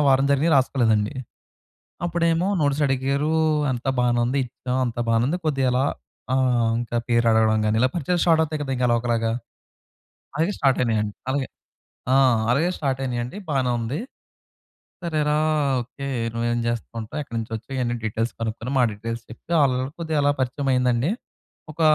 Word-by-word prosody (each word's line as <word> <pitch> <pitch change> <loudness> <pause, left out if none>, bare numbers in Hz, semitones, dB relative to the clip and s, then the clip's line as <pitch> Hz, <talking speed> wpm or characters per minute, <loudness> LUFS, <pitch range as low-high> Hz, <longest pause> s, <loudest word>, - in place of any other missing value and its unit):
వారం 135 +1 +4
జరిగినియి 150 +4 +3
రాసుకోలేదండి. 115 -5 +2 0.9
అప్పుడేమో 170 +1 +1
నోట్స్ 145 0 +1
అడిగారు. 140 +3 0 0.4
అంత 125 +1 -4
బానే 120 -1 +2
ఉంది 130 +3 0
ఇచ్చాం. 125 +1 -4
అంత 120 0 -4
బానే 115 0 +3
ఉంది. 175 +5 0
కొద్దిగా 135 -4 +1
అలా 130 +2 +2 0.5
ఆహ్, 125 -3 +2
ఇంకా 120 0 -2
పేరు 115 -1 +2
అడగడం 110 -1 +3
గాని, 110 +1 +2
ఇలా 130 - +4
పరిచయాలు 175 +2 0
స్టార్ట్ 165 -2 +5
అవుతాయి 155 -1 -3
గదా, 135 - -4
ఇంకా 125 - +1
అలా 120 - +4
ఒకలాగా. 115 -2 0 1.3
స్టార్ట్ 135 -3 +3
అయినాయండి. 105 -3 0 0.2
అలగే 135 -1 0 0.6
ఆ! - - +5 0.4
అలగే 155 +7 +2
స్టార్ట్ 135 -3 -1
అయినాయండి. 125 +6 -3
బానే 135 -3 +1
ఉంది. 120 +8 -3 1.0
సరేరా 150 -3 0 0.4
ఓకే 140 +3 -7 0.3
నువ్వేం 120 0 -1
చేస్తుంటావు 115 +3 -4
ఎక్కడి 115 -4 -7
నుంచి 115 0 -5
వచ్చి 110 +4 -8
ఇవన్నీ 120 -2 0
డీటెయిల్స్ 110 +2 -1
కనుక్కొని 115 +2 -3
మా 130 - +5
డీటెయిల్స్ 115 +3 -5
చెప్తే 120 +8 -9
ఆళ్ళు 130 -2 +2
కొద్దిగా 160 -2 -1
అలా 145 - +4
పరిచయం 135 +2 -1
అయిందండి. 125 +4 +2 0.6
ఒక 165 - -13
125 Hz, 155 wpm, -23 LUFS, 115-140 Hz, 1.3 s, స్టార్ట్